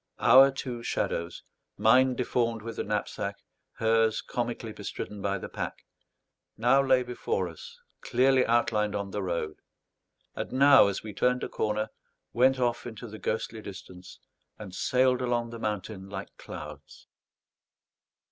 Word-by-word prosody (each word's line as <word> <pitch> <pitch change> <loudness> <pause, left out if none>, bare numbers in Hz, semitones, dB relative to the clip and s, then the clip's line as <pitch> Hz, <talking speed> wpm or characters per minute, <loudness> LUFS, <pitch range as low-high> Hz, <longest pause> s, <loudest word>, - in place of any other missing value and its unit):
Our 135 +1 +7
two 130 -3 -5
shadows 85 -6 -2 0.3
mine 130 +3 +5
deformed 115 -3 -1
with 115 0 -7
the - - -1
knapsack, - - -3 0.4
hers 110 0 +2
comically - - -3
bestridden 105 -1 -6
by 100 0 0
the - - -6
pack - - -6 0.7
now 125 +5 +4
lay 130 -2 +3
before 125 - -2
us 475 0 -11 0.2
clearly 130 +1 +3
outlined 110 -3 +1
on 100 -1 -3
the 105 - -3
road, 85 -4 -3 0.8
and - - -5
now, 135 -3 +7
as 100 - -3
we 105 -1 -7
turned 125 +5 +1
a - - -3
corner, 110 0 -1 0.4
went 130 +3 +4
off 120 -1 0
into 120 +1 -8
the 110 0 -9
ghostly 110 0 -3
distance, 95 -2 -10 0.4
and 100 -4 -9
sailed 130 +4 +2
along 120 -2 -1
the 115 - -7
mountain 105 -2 -4
like 100 0 -7
clouds. - - -10
115 Hz, 140 wpm, -28 LUFS, 105-125 Hz, 0.8 s, Our